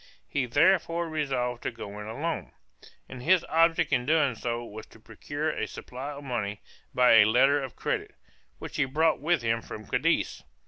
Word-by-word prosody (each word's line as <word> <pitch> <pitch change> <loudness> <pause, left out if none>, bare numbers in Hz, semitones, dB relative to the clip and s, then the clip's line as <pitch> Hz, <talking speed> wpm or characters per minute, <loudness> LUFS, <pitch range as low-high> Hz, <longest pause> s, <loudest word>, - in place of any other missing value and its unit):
He 135 -3 -1
therefore 170 +4 +2
resolved 130 -6 -2
to - - -2
go 100 0 -8
in 105 - -7
alone; 150 +9 -4 0.5
and 125 - -9
his 175 +5 +3
object 165 -2 +3
in 125 0 +1
doing 155 -4 +3
so 120 +1 -4
was 110 0 -9
to - - -18
procure 145 +8 -4
a - - -3
supply 130 +3 -7
of 145 0 -9
money 105 -6 -3 0.3
by 125 -2 +5
a 105 - +8
letter 135 +6 +4
of 135 -3 -7
credit - - -3 0.4
which - - -8
he 145 - +3
brought 155 +4 +2
with 165 -3 +1
him 115 0 0
from 110 -1 -9
Cadiz. - - 0
130 Hz, 180 wpm, -28 LUFS, 115-155 Hz, 0.5 s, a